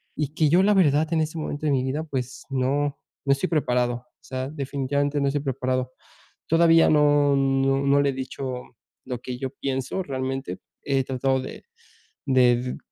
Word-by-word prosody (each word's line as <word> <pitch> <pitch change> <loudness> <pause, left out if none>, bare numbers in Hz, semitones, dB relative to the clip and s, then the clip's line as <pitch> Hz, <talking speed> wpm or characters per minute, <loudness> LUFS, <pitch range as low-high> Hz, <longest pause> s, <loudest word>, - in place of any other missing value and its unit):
y 150 -1 -3
que 155 -3 +3
yo 180 +4 +5
la 210 +1 +4
verdad 155 -2 +3
en 160 - +2
este 155 +1 -3
momento 155 0 -4
de 140 - +2
mi 130 -1 +1
vida, 140 +4 -2
pues 130 -4 -5
no 140 +2 0 0.3
no 140 - +2
estoy 160 +7 -2
preparado. 125 -6 +1
O 120 - -15
sea, 130 +1 -4
definitivamente 140 0 -1
no 140 - +1
estoy 140 +1 0
preparado. 130 -1 -1 0.6
Todavía 165 0 +5
no 145 -1 +4
no 135 0 +2 0.2
no 140 - +5
le 140 - +2
he - - -1
dicho 135 - -8 0.6
lo 125 -2 -4
que 125 -1 -5
yo 130 - -3
pienso 135 +7 -2
realmente. 135 -1 -4 0.2
He 135 -2 +1
tratado 130 0 0
de - - -8 0.6
de 125 -1 +3
135 Hz, 175 wpm, -24 LUFS, 130-150 Hz, 0.6 s, yo